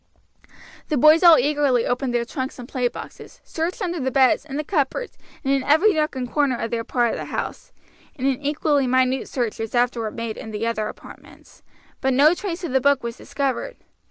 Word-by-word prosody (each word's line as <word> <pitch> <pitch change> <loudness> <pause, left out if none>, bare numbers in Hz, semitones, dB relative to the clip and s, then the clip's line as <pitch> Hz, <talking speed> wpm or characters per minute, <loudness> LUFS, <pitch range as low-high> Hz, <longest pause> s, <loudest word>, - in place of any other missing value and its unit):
The 305 - +1
boys 310 +5 +6
all 340 -3 +8
eagerly 280 -3 +2
opened 250 +1 -1
their 240 -1 0
trunks 260 +2 -5
and 245 -2 -9
play 255 -2 0
boxes, - - -10
searched 350 +7 -3
under 350 -2 -2
the 260 -1 -1
beds, 265 +2 +3
in 280 -2 -6
the 305 - -2
cupboards, 315 - -2 0.3
and 275 - +1
in 275 - +1
every 320 +10 +4
nook 305 -3 0
and 255 -1 -3
corner 275 -1 +1
of 230 - -4
their 230 -1 -1
part 240 -1 0
of - - -4
the - - -5
house, - - -5 0.4
and 260 - -4
an 270 0 0
equally 290 -1 +1
minute 255 +1 +1
search 240 -5 -2
was 225 +1 -4
afterward 240 -2 0
made 230 -2 -4
in - - -8
the 215 +1 -3
other 220 -2 -1
apartments; - - -13 0.4
but 265 -1 +1
no 295 +5 +6
trace 365 -1 -5
of 340 - -3
the 265 0 +2
book 280 -1 +2
was 235 -1 -4
discovered. 280 - -3
265 Hz, 210 wpm, -22 LUFS, 245-300 Hz, 0.4 s, all